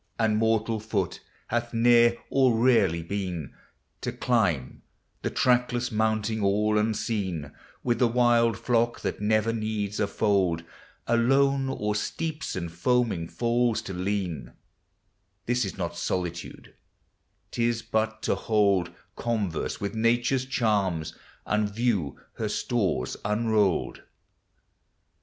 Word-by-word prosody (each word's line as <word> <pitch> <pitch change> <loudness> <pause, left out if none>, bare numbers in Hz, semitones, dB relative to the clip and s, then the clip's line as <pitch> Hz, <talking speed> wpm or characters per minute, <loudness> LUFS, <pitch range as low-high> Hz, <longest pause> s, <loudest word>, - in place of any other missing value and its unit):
And 110 -2 +2
mortal 110 0 +1
foot 105 -5 -2 0.3
hath 120 0 -2
ne'er 120 0 +5 0.2
or 130 -4 +4
rarely 110 -9 +3
been; 90 -5 -4 0.5
To - - -2
climb 95 - 0 0.4
the - - -1
trackless 125 -1 +1
mountain 110 0 0
all 105 +2 +2
unseen, 100 -8 -2 0.3
With 120 -2 0
the 125 - +5
wild 115 -2 +3
flock 120 -1 0
that - - -3
never 110 +2 +2
needs 110 -2 -2
a 105 - +2
fold; 95 -5 +1 0.4
Alone 135 +3 +3
o'er 105 -5 -1
steeps 155 +9 -3
and 85 -3 -4
foaming 100 -1 0
falls 120 +2 +1
to 95 - -6
lean, 90 -8 -3 0.4
— 95 +1 -47
This 120 -1 +1
is 95 - -6
not - - -3
solitude; 85 -2 -4 0.8
't - - -3
is 115 -1 0
but 110 0 -1
to - - +2
hold 100 -5 +2 0.3
Converse 105 -8 -2
with 100 0 -3
Nature's 120 +3 +1
charms, 100 - 0 0.3
and 105 0 +1
view 105 - -1 0.2
her - - -2
stores 95 - -1
unrolled. 105 -2 +1
110 Hz, 120 wpm, -27 LUFS, 95-120 Hz, 0.8 s, ne'er